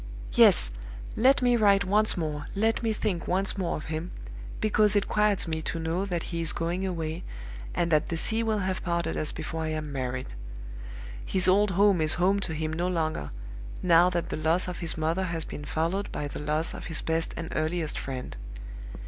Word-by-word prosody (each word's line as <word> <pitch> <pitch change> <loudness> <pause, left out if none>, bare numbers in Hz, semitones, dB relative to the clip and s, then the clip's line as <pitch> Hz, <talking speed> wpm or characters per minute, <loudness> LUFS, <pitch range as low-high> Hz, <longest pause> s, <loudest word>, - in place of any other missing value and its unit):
"Yes! - - +6 0.4
Let 260 +3 +4
me 245 -1 +4
write 200 -3 +4
once 210 +2 +3
more 150 -3 -3
let 225 +3 +1
me 225 -1 0
think 210 -5 -2
once 190 +2 +1
more 185 -4 -2
of 155 - -8
him, 160 +2 -4 0.5
because 215 -1 +3
it 205 - +1
quiets 210 -3 +2
me 160 -1 -2
to 165 - -4
know 165 +4 -2
that 175 -4 -3
he 170 - -2
is 165 - +3
going 175 +3 -2
away, 165 -2 -4 0.5
and 170 -1 0
that 155 -1 +2
the 165 - -2
sea 225 +7 +2
will 220 -1 0
have 190 -2 -2
parted 170 -2 -2
us 155 - -1
before 160 0 -5
I 160 - -2
am 155 -1 -4
married. 130 - -4 0.9
His 185 -1 +3
old 200 +3 +4
home 200 -4 +4
is 155 +1 +6
home 190 +3 +2
to 180 -5 -3
him 155 0 -3
no 175 +3 -1
longer, 160 - -2 0.5
now 175 0 +5
that 170 -2 -3
the - - -2
loss 160 +4 +1
of 180 - -5
his 165 -2 +2
mother 165 +4 0
has 165 -3 -2
been 145 - -8
followed 170 +7 -2
by 145 - -4
the - - -7
loss 150 +2 +1
of - - -8
his 165 -2 -1
best 165 0 -2
and 165 -1 -5
earliest 155 0 -1
friend. 130 -2 -6
170 Hz, 200 wpm, -27 LUFS, 160-195 Hz, 0.9 s, Yes